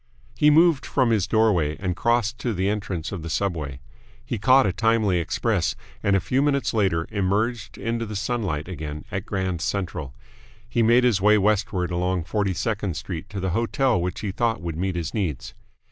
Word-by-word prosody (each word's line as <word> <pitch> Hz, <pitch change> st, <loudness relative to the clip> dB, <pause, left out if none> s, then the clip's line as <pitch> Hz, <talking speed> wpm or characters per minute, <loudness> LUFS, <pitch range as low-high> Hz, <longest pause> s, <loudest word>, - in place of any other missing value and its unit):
He 150 Hz, -, +5 dB
moved 160 Hz, -1 st, +5 dB
from 130 Hz, -4 st, +1 dB
his 100 Hz, -6 st, +2 dB
doorway 95 Hz, -9 st, +2 dB
and 90 Hz, -2 st, -2 dB
crossed 120 Hz, +2 st, +1 dB
to 120 Hz, -4 st, -2 dB
the 95 Hz, +2 st, 0 dB
entrance 100 Hz, -5 st, -3 dB
of 95 Hz, -4 st, -5 dB
the 85 Hz, -, -6 dB
subway. 80 Hz, -8 st, -2 dB, 0.4 s
He 115 Hz, -, -3 dB
caught 130 Hz, +4 st, +5 dB
a 95 Hz, -, +1 dB
timely 110 Hz, -3 st, +2 dB
express, 85 Hz, -, 0 dB, 0.3 s
and 100 Hz, -, +2 dB
a -, -, +4 dB
few 130 Hz, +8 st, 0 dB
minutes 140 Hz, -2 st, +1 dB
later 95 Hz, -7 st, +1 dB
emerged 105 Hz, +3 st, -1 dB
into 115 Hz, 0 st, -2 dB
the 105 Hz, -, -6 dB
sunlight 100 Hz, -9 st, -2 dB
again 75 Hz, -4 st, -6 dB
at -, -, -4 dB
Grand 95 Hz, -3 st, -2 dB
Central. 80 Hz, -10 st, -3 dB, 0.5 s
He 120 Hz, 0 st, 0 dB
made 120 Hz, +2 st, +5 dB
his 115 Hz, -6 st, +3 dB
way 105 Hz, +2 st, +5 dB
westward 100 Hz, -3 st, +1 dB
along 90 Hz, 0 st, 0 dB
Forty 100 Hz, 0 st, -1 dB
second 100 Hz, -2 st, -2 dB
Street 90 Hz, 0 st, -6 dB
to 100 Hz, -, -5 dB
the 95 Hz, -1 st, -1 dB
hotel 115 Hz, +1 st, +1 dB
which 90 Hz, 0 st, -3 dB
he 105 Hz, -2 st, -2 dB
thought 115 Hz, +3 st, 0 dB
would 85 Hz, -2 st, -5 dB
meet 95 Hz, +2 st, -2 dB
his 85 Hz, -3 st, -3 dB
needs. 85 Hz, -, -3 dB
100 Hz, 190 wpm, -24 LUFS, 90-115 Hz, 0.5 s, He